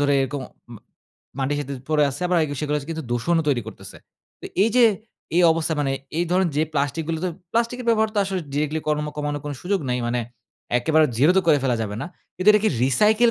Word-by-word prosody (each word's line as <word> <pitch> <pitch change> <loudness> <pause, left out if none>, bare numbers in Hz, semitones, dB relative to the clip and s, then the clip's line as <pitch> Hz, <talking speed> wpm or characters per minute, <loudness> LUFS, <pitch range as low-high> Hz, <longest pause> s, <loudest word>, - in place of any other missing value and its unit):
ধরে 145 0 +3
এরকম 135 0 -3 0.3
ম - - -9 0.6
মাটির 140 +2 0
সাথে 140 -1 -5 0.2
পড়ে 155 -1 +3
আছে 135 - -8
আবার 180 -1 +2
এগ 150 - -5
সেগুলা 150 0 0
য - - -10
কিন্তু 160 -1 -4
দূষণও 160 +8 +1
তৈরি 130 -5 +1
করতেছে। 100 -3 -10 0.4
তো - - -12 0.2
এই 215 - +4
যে 245 - +7 0.5
এই 180 - +5
অবস্থায় 160 -1 -1
মানে 135 -2 0 0.3
এই 175 - +2
ধরনের 180 -1 +2
যে 155 - +3
প্লাস্টিক 145 +2 -1
গুলো 165 -1 -1
তো 185 - +1 0.2
প্লাস্টিকের 235 +2 -1
ব্যবহার 220 -1 +3
তো - - +1
আসলে 190 -1 -2
ডিরেক্টলি 150 +2 -1
কর্ম 150 0 0
কমানোর 145 0 -2
কোনো 145 -1 -4
সুযোগ 195 +1 0
নাই। 125 - 0
মানে 120 +1 0 0.6
একেবারে 155 +5 +3
জিরো 145 +9 +5
তো - - +6
করে 150 -3 +5
ফেলা 125 -3 +2
যাবে 105 -2 -4
না। - - -4 0.3
কিন্তু 185 +3 +1
এটা 210 - +4
কে - - +5 0.2
রিসাইকেল 215 - +4
155 Hz, 220 wpm, -23 LUFS, 140-185 Hz, 0.6 s, যে